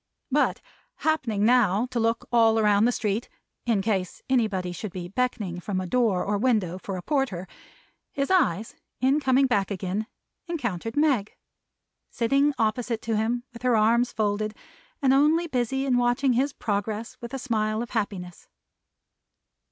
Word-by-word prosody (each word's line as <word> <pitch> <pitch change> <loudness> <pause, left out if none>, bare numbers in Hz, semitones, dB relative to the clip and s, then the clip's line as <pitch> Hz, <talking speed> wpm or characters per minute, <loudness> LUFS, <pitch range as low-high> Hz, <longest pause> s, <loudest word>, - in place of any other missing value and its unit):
But - - +2 0.3
happening 235 -10 0
now 230 -3 +4
to 245 - -1
look 230 0 0
all 225 -2 +4
round 210 0 +4
the - - +3
street 215 -1 -2 0.4
in 215 -5 +2
case 190 -4 -2
anybody 210 -9 +1
should 190 +3 -6
be 175 -1 -6
beckoning 210 -5 -2
from 185 +1 -3
any 185 -2 -5
door 225 -8 +2
or 205 0 -1
window, 205 -7 +1
for 190 0 -5
a 180 - -7
porter 260 - -1 0.6
his 275 +4 -2
eyes, 220 - +2 0.3
in 270 +3 +3
coming 265 -1 +3
back 205 -7 +1
again, 195 +2 -3 0.4
encountered 235 - -3
Meg: 275 -9 +2 0.7
sitting 275 +5 +2
opposite 225 0 -1
to 225 -1 -1
him, 230 +3 0
with 235 - -11
her 250 -2 +3
arms 235 +3 +3
folded; 215 0 -1 0.5
and 265 -1 +5
only 305 +5 +4
busy 265 -2 -1
in 255 -2 +2
watching 245 +2 +2
his 270 +4 +1
progress 215 -1 -3
with 235 0 -7
a 270 - -3
smile 220 -3 -1
of 240 - -10
happiness. 195 -6 -4
225 Hz, 155 wpm, -26 LUFS, 205-255 Hz, 0.7 s, and